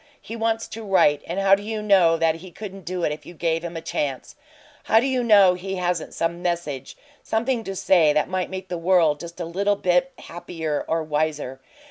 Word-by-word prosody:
He 225 - -8
wants 225 0 -1
to 225 - -7
write, 165 -8 +3
and 175 +3 -3
how 195 0 +4
do 195 - +4
you 215 +1 -4
know 190 -6 +4
that 165 0 +1
he 185 +3 -11
couldn't 195 +1 -9
do 180 0 -3
it - - +1
if 150 0 -6
you 175 - -12
gave 165 0 -1
him 170 -1 -5
a - - -5
chance? 140 -4 -4 0.5
How 225 - +5
do 245 - 0
you 260 -2 +1
know 200 -5 +6
he 190 +2 -5
hasn't 180 -2 -2
some 170 +1 -2
message 170 -7 -3 0.2
something 235 +1 -1
to 195 - -5
say 175 -5 +4
that 150 0 +1
might 185 -1 -2
make 190 0 -6
the 175 - -3
world 165 -4 +3
just 170 +1 -9
a 170 - -3
little 200 +5 0
bit 185 +7 +1
happier 165 -3 -5
or 165 0 0
wiser? 150 -3 -2
175 Hz, 215 wpm, -23 LUFS, 165-195 Hz, 0.5 s, know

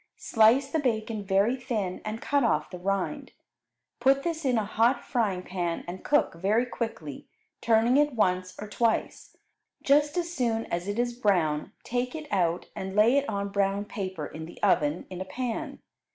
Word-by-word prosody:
Slice 245 +5 +3
the 320 - +1
bacon 220 -5 -1
very 200 +5 +2
thin 225 -8 -3
and 215 +2 -5
cut 285 -1 +2
off 170 -8 +1
the 180 - -7
rind; 195 0 -2 0.7
put 275 +1 +3
this 330 -2 -2
in 250 -3 +2
a 215 - 0
hot 235 +4 +1
frying 200 -7 0
pan 175 -3 -3
and 180 +2 -7
cook 295 0 +2
very 200 +8 +1
quickly, 225 - -5 0.3
turning 230 +3 +4
it 295 -1 +3
once 185 -3 +1
or 210 - -6
twice. 225 +2 -1 0.5
Just 290 +3 +3
as 345 -1 -2
soon 230 -6 0
as 175 +2 -2
it 205 +1 -2
is 240 0 0
brown 180 -8 +1
take 250 +3 -2
it 310 -1 -6
out 175 -2 +1
and 190 0 -5
lay 220 +5 +5
it 280 -2 +1
on 200 -1 -2
brown 200 0 0
paper 190 -7 -5
in 160 +1 -8
the 175 - -12
oven 150 +3 +2
in 185 0 -6
a - - -3
pan. 245 +2 -4
215 Hz, 180 wpm, -27 LUFS, 185-250 Hz, 0.7 s, lay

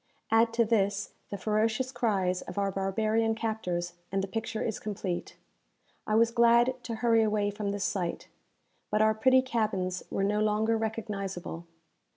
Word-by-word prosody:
Add 225 +1 +4
to 230 0 +3
this 205 -2 +1 0.2
the 200 - -4
ferocious 220 +5 0
cries 195 -7 0
of 180 - -9
our 200 -1 +1
barbarian 215 +4 0
captors, 180 -6 -2 0.2
and 195 0 0
the - - -2
picture 225 +2 -3
is 220 - -2
complete. 195 -4 -4 0.7
I 215 - +1
was 230 +1 +4
glad 235 +1 +5
to 230 - -3
hurry 230 0 +3
away 210 -1 +1
from 205 0 -3
this 200 0 -2
sight; 175 -4 -2 0.6
but 210 +1 +3
our 220 0 +4
pretty 260 +4 +4
cabins 205 -7 -1
were 195 - -1
no 210 +1 +1
longer 215 +1 +2
recognizable. 200 -6 -4
215 Hz, 160 wpm, -29 LUFS, 195-225 Hz, 0.7 s, glad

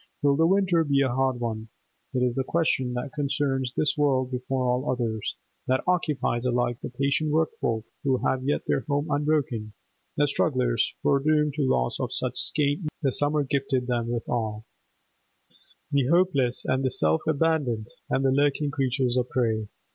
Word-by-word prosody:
Will 140 -1 +4
the 160 +3 +3
winter 185 -3 +3
be 140 -2 +2
a 130 -3 +1
hard 130 -1 0
one? 110 -2 -3 0.5
It 125 - +2
is 125 -1 +1
the 135 - -1
question 135 -5 0
that 125 +4 -4
concerns 140 -3 -1
this 150 - +2
world 135 -3 +1
before 130 +1 -2
all 125 +3 0
others, 115 -4 -2 0.3
that 130 0 +1
occupies 150 -9 0
alike 120 -1 0
the - - -5
patient 140 +4 0
workfolk 145 -8 0 0.2
who 135 -2 +2
have 130 -1 0
yet 145 +2 -1
their - - +1
home 145 +2 0
unbroken, 145 -7 0 0.4
the - - +4
strugglers - - +1
foredoomed 150 +1 +2
to 140 -3 0
loss 60 0 0
of - - -2
such - - -1
scant 145 -1 +2
needments 165 - -5
as - - -44
the 135 - +2
summer 145 +2 +2
gifted 135 -2 -1
them 120 -2 -1
withal, 115 -2 -3 1.3
the 140 -3 +2
hopeless 150 -7 +2
and 130 +1 0
the 130 - +2
self 80 -8 +2
abandoned 145 -8 0 0.2
and 135 - +1
the 135 - +4
lurking 145 +1 +1
creatures 130 -3 0
of 125 0 0
prey. 110 -4 0
135 Hz, 170 wpm, -26 LUFS, 125-145 Hz, 1.3 s, Will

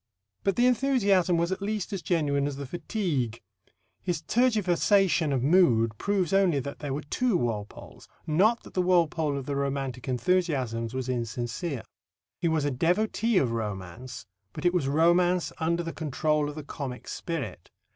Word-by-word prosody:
But 195 -2 +1
the 240 - +3
enthusiasm 210 -9 +3
was 170 +2 0
at 190 - -3
least 205 -1 -3
as 195 - -3
genuine 145 -6 +1
as 145 - -4
the 140 0 -6
fatigue. 145 - -2 0.6
His 175 -3 -2
tergiversation 195 - +2
of 130 -3 0
mood 125 - +4
proves 195 -3 0
only 190 -7 +3
that 140 +2 -6
there 145 -2 -4
were 145 +3 -3
two 235 +6 +1
Walpoles, 110 -6 -5 0.2
not 205 +10 +3
that - - -13
the 185 - +1
Walpole 165 -5 +2
of 135 - -5
the 140 - -3
romantic 135 -2 -3
enthusiasms 130 -5 0
was 130 -1 -3
insincere. 120 +4 -3 0.6
He 170 - 0
was 160 -3 +1
a 145 - +1
devotee 205 - +1
of 130 -9 +2
romance, 105 +1 -5 0.3
but - - -7
it 175 - +4
was 175 -7 +1
romance 175 +4 +3
under 170 +2 0
the 165 - -5
control 150 0 0
of 145 - -8
the 155 - -6
comic 135 -3 -6
spirit. 160 - -5
160 Hz, 165 wpm, -27 LUFS, 130-185 Hz, 0.6 s, mood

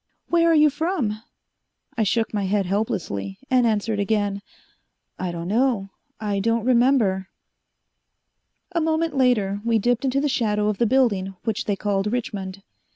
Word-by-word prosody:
"Where 335 -1 +4
are 330 - +4
you 300 -1 +5
from?" 290 - -2 0.7
I 230 - -1
shook 220 +2 0
my 205 -2 -1
head 195 0 +1
helplessly, 160 - -2
and 250 -2 +4
answered 215 -1 0
again, 205 -1 0 0.8
"I 180 -1 -2
don't 170 0 -5
know 220 -2 +1 0.3
I 205 -2 -1
don't 230 +2 0
remember." 235 -7 +3 1.4
A 340 -2 0
moment 320 -1 0
later 215 -7 +2
we 230 -1 +2
dipped 240 +4 +1
into 270 0 +1
the 295 - +1
shadow 210 -6 +1
of 210 - -3
the 235 - +3
building, 205 -7 +1
which 220 -3 -2
they 205 - 0
called 200 0 -1
Richmond. 195 -5 -4
215 Hz, 155 wpm, -23 LUFS, 200-255 Hz, 1.4 s, you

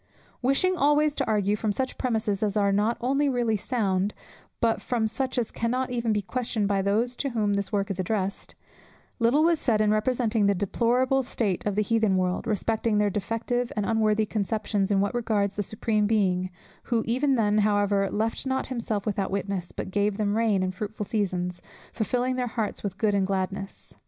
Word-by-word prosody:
Wishing 275 +9 +2
always 295 -2 +3
to - - -1
argue 210 -1 +2
from 210 0 -1
such 260 +5 -2
premises 220 -5 -1
as 210 -1 0
are 200 -1 +3
not 210 +4 +1
only 275 +4 +2
really 240 -4 +1
sound, 200 -3 -1 0.4
but 230 -1 +1
from 235 -3 0
such 255 +4 -2
as 235 -3 0
cannot 250 +2 -1
even 235 -2 0
be 210 -1 0
questioned 220 +1 -1
by 200 -1 +1
those 220 +6 +1
to 275 - -1
whom 215 -4 0
this 200 -1 -1
work 200 -1 0
is 190 - -5
addressed, 195 +1 -2 0.6
little 245 +6 +4
was 335 -1 +3
said 230 -7 +1
in 215 -1 +3
representing 220 -1 +1
the 200 - +3
deplorable 245 +7 +1
state 220 -7 -2
of 205 - -1
the 210 - +2
Heathen 220 -3 +2
world, 185 0 -1
respecting 220 +1 0
their 205 -1 +2
defective 235 +4 -2
and 210 -1 -1
unworthy 220 -1 +2
conceptions 210 -1 -1
in 195 -2 +3
what 200 - 0
regards 215 -4 0
the 205 - -2
Supreme 210 +1 0
Being, 185 -4 +1 0.4
who 230 -2 +1
even 260 +4 +2
then 215 -3 +2
however 205 -1 +2
"left 220 +2 -1
not 265 0 0
himself 220 -4 -2
without 200 -3 -1
witness, 195 -2 -3
but - - -6
gave 205 0 +1
them 210 -1 0
rain 215 -4 +2
and 185 0 -2
fruitful 210 +2 -5
seasons, 180 -4 -2 0.3
filling 250 +3 -1
their 250 -1 0
hearts 220 -2 -3
with 200 -2 -4
food 210 +1 +1
and 195 -1 +1
gladness." 195 0 -4
215 Hz, 190 wpm, -26 LUFS, 200-235 Hz, 0.6 s, little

